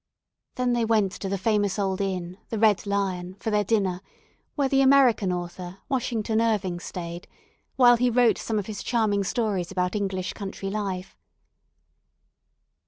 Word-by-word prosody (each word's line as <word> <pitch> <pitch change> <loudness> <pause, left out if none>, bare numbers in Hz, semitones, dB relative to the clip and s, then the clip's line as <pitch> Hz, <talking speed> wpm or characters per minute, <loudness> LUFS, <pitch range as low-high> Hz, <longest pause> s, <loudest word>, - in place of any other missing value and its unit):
Then 250 -1 +1
they 240 -1 +1
went 215 -4 +2
to 195 0 -5
the 195 - -1
famous 205 0 +1
old 195 -1 -1
inn, 185 -1 -3
the 225 - -3
Red 210 -2 +3
Lion, 185 -2 -2
for 220 +2 -4
their 210 0 +2
dinner, 195 -4 0 0.5
where 280 -3 +1
the 270 0 +3
American 265 -8 +4
author, 175 +1 -5
Washington 230 -4 0
Irving, 205 -6 0
stayed, 175 -1 -7 0.5
while 245 -2 +6
he 250 +1 +2
wrote 240 -1 +3
some 220 - -2
of 205 - -2
his 205 -2 -6
charming 215 -4 +1
stories 195 -4 -1
about 180 0 -1
English 190 -3 -2
country 195 -1 -5
life. 195 -3 -4
205 Hz, 155 wpm, -25 LUFS, 185-225 Hz, 0.5 s, while